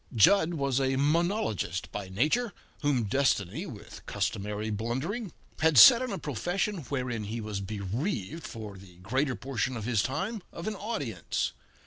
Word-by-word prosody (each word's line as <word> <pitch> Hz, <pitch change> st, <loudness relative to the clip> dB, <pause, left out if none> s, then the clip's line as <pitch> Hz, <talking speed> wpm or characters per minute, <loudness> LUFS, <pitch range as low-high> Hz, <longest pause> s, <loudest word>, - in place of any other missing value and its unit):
Jud 165 Hz, -, +5 dB
was 140 Hz, -3 st, +1 dB
a 135 Hz, 0 st, +1 dB
monologist 150 Hz, -, 0 dB
by 100 Hz, -2 st, -5 dB
nature, 155 Hz, -, +1 dB, 0.3 s
whom 145 Hz, -5 st, +2 dB
Destiny, 130 Hz, -, +1 dB
with 105 Hz, -, -10 dB
customary 105 Hz, +1 st, -2 dB
blundering, 135 Hz, -, -2 dB, 0.3 s
had 160 Hz, -2 st, +3 dB
set 235 Hz, -, +11 dB
in 255 Hz, -2 st, -2 dB
a 195 Hz, -, -2 dB
profession 175 Hz, -, -2 dB
wherein 125 Hz, -4 st, -2 dB
he 110 Hz, +3 st, -4 dB
was 105 Hz, -2 st, -4 dB
bereaved, 105 Hz, -, -3 dB
for 105 Hz, -4 st, -8 dB
the 95 Hz, -2 st, -15 dB
greater 130 Hz, +9 st, -1 dB
portion 130 Hz, -1 st, -2 dB
of 110 Hz, -, -5 dB
his 115 Hz, -4 st, +2 dB
time, 190 Hz, -, -2 dB
of 170 Hz, -, -7 dB
an 215 Hz, -, -1 dB
audience. 145 Hz, -, -3 dB
130 Hz, 150 wpm, -29 LUFS, 105-165 Hz, 0.3 s, set